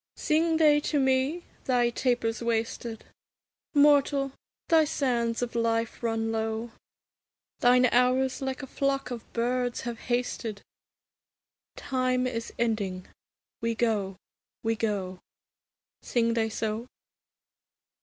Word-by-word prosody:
Sing 320 +1 +2
they 300 -2 +5
to 295 0 0
me? 265 +5 +1 0.2
'Thy 245 -2 +2
taper's 240 -2 0
wasted; 230 0 -2 0.7
Mortal, 285 -1 +4 0.4
thy 325 -2 +5
sands 245 -5 0
of 240 - -4
life 230 0 0
run 225 -1 -1
low; 225 +1 -2 0.9
Thine 250 +1 +5
hours 250 +2 +2
like 265 +1 -3
a - - -3
flock 275 0 -1
of 235 -2 -7
birds 245 +1 -1
have 235 -1 -5
hasted: 240 -4 -2 1.1
Time 255 -1 0
is 230 -2 -3
ending; 205 -6 -1 0.5
we 230 0 0
go, 210 -5 0 0.5
we 225 0 +1
go.' 195 -5 -2 0.8
Sing 230 -1 +1
they 225 -1 +1
so? 220 +2 -3
240 Hz, 110 wpm, -28 LUFS, 225-265 Hz, 1.1 s, they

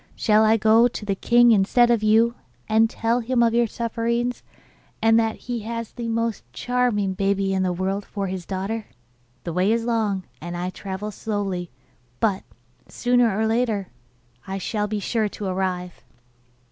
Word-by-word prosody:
Shall 215 -1 +3
I 220 +1 +4
go 220 +2 +5
to 225 -3 -7
the 200 - 0
king 240 +4 +4
instead 230 +4 +4
of 235 -3 +2
you, 220 +2 +4 0.3
and 220 +1 +3
tell 230 +1 0
him 240 0 +1
of 230 -1 +2
your 235 0 +3
sufferings, 235 +2 -2 0.6
and 225 0 +4
that 225 -1 0
he 245 -1 -3
has 230 +1 -5
the 235 -1 -6
most 230 -1 -1
charming 245 -6 0
baby 195 0 0
in 190 - +1
the 185 -1 +1
world 190 +3 -2
for 200 0 -4
his 185 -1 -4
daughter? 200 +4 -4 0.6
The 170 - -4
way 185 +4 +2
is 230 0 0
long, 215 -5 0 0.2
and 175 +1 -5
I 180 +1 -3
travel 195 +2 -6
slowly; 195 -5 -3 0.5
but, 200 -4 +1 0.5
sooner 245 -4 +2
or 220 - +1
later, 220 -4 0 0.6
I 190 0 -3
shall 210 +2 -2
be 210 0 -2
sure 215 +1 0
to 205 - -7
arrive. 185 -2 -3
215 Hz, 170 wpm, -23 LUFS, 195-230 Hz, 0.6 s, go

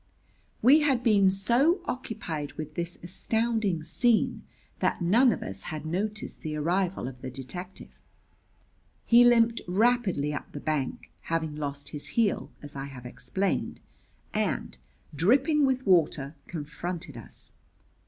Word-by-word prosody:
We 275 +6 +8
had 275 -5 +2
been 205 -5 +5
so 240 - +2
occupied 190 - -4
with 155 -2 -7
this 170 0 -2
astounding 220 -1 0
scene 220 +8 +2 0.4
that - - +1
none 225 +9 +4
of - - -3
us 95 0 -3
had 155 -1 -5
noticed 205 +6 -3
the 155 -2 -4
arrival 175 +1 0
of 130 -1 -9
the 130 - -5
detective. 175 +9 -8 1.1
He 240 +1 +7
limped 235 -1 +4
rapidly 190 -7 +2
up 145 - -6
the 145 - -5
bank 150 -3 -2
having 160 -2 -1
lost 145 -1 -4
his 145 - -5
heel, 225 -4 +2
as 145 -1 -9
I 135 0 -4
have 130 -3 -10
explained 125 +11 -2 0.5
and, - - -1 0.4
dripping 270 - +3
with 260 -1 0
water, 160 -6 +3
confronted 165 -1 -5
us. 115 - -10
180 Hz, 135 wpm, -28 LUFS, 150-230 Hz, 1.1 s, We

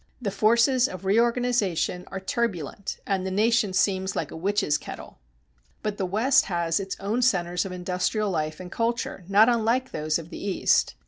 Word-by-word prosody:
The 215 -6 -3
forces 235 +5 +3
of 185 +1 -8
reorganization 215 -6 +1
are 195 - -5
turbulent 190 - -3
and 195 -2 -1
the 190 - -2
nation 215 +2 +2
seems 190 0 +1
like - - -3
a - - -8
witches' 180 -3 0
kettle. - - -10 0.6
But 210 -1 -2
the 190 - 0
West 260 +10 +3
has 170 -2 0
its 195 -1 -5
own 215 +5 -1
centers 180 -7 +1
of 190 - -5
industrial 180 +3 -1
life 155 -2 -2
and 180 -1 -9
culture 230 -4 -2
not 205 +3 +6
unlike 240 +2 +1
those 155 0 -1
of 165 +1 -10
the - - -7
East. 200 -2 +1
195 Hz, 175 wpm, -25 LUFS, 180-230 Hz, 0.6 s, not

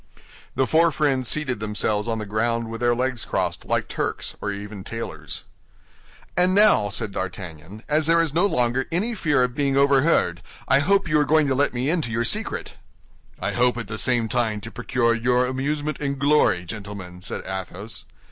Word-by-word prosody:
The 135 - +2
four 165 +4 +4
friends 135 -4 +1
seated 140 -7 -1
themselves 105 0 -1
on 115 -1 -1
the 105 - -4
ground 115 +2 -1
with 115 - -6
their 120 0 +3
legs 125 -1 -1
crossed - - -2
like - - 0
Turks, - - -3
or 105 - -2
even 100 0 -7
tailors. 80 -10 -6 0.9
"And 180 +1 +3
now," 200 - +5
said 105 +1 -2
D'Artagnan, 95 +1 -7
"as 155 +1 +2
there 165 0 +4
is 165 -3 +1
no 175 +5 +3
longer 125 -4 +1
any 205 +8 0
fear 150 - +2
of 125 -1 -1
being 140 0 0
overheard, 140 - +3 0.3
I 135 - +5
hope 190 +5 +2
you 155 -1 +3
are - - +4
going 155 +1 +3
to 140 - +1
let 140 +2 +2
me 125 +2 -2
into 165 -8 0
your 115 +1 0
secret." - - -1 0.6
"I 95 +2 -2
hope 125 +3 +2
at 115 -3 -5
the 110 +1 -4
same 120 +1 +2
time 110 -3 0
to 115 - -7
procure 120 +1 +1
you 120 +2 +1
amusement 145 +4 -2
and 140 -1 -2
glory, 140 -11 +3
gentlemen," 100 -2 -8
said 95 - -4
Athos. 95 +3 -6
120 Hz, 185 wpm, -23 LUFS, 105-145 Hz, 0.9 s, now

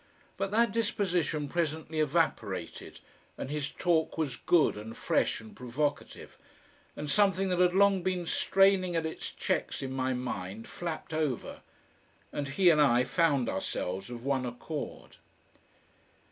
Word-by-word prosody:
But 195 - -2
that 225 +1 +3
disposition 180 -9 0
presently 160 0 -2
evaporated, 145 - -1 0.4
and 135 - -5
his 150 -1 -2
talk 165 -3 0
was 150 -6 -1
good 170 -3 +3
and 110 +2 -8
fresh - - +1
and 110 -1 -13
provocative. 145 +4 -3 0.6
And 150 - -5
something 195 +4 +3
that 180 -1 0
had 180 0 +4
long 200 -1 +5
been 180 -1 -1
straining 190 0 +3
at 165 -1 0
its 160 - -4
checks - - -2
in 130 - -4
my 130 0 0
mind 110 -4 -5
flapped 165 -2 -5
over, 150 -7 -2 0.7
and 145 - -2
he 175 +6 +4
and 150 -2 +4
I 125 -3 +5
found 140 -5 +2
ourselves 95 +1 -3
of 120 0 -8
one 135 -2 +1
accord. 125 +5 -6
155 Hz, 140 wpm, -30 LUFS, 130-180 Hz, 0.7 s, long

